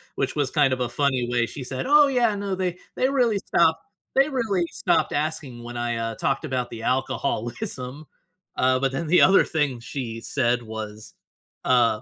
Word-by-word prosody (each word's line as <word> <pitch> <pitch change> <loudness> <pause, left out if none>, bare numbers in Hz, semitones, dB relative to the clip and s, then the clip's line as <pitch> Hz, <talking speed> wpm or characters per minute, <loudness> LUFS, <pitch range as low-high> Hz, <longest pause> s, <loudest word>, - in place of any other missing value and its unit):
which 135 -1 -2
was 145 -4 0
kind 145 -3 +3
of 130 - -3
a 125 - 0
funny 130 -1 0
way, 120 -1 +1
she 135 - -7
said, 130 +1 -4
"Oh, 295 +1 +7
yeah, 240 -5 +2
no, 200 -1 -3
they 180 -1 -2 0.2
they 260 - +2
really 245 -7 +2
stopped 165 -3 +2 0.3
they 275 +2 +4
really 220 - 0
stopped 165 -4 +1
asking 145 -5 -3
when 120 0 -8
I, 120 0 -1
uh, 115 0 -3
talked 135 +6 -1
about 130 -4 -2
the 115 -1 -8
alcoholism." 130 +2 -2 0.5
Uh, 130 0 +3
but 135 0 0
then, 135 +5 -3
the 180 +3 +5
other 195 - +6
thing 145 -6 -1
she 115 -2 -6
said 120 -1 0
was, 110 -1 -8 0.5
uh 120 -4 +3
135 Hz, 185 wpm, -24 LUFS, 120-175 Hz, 0.5 s, Oh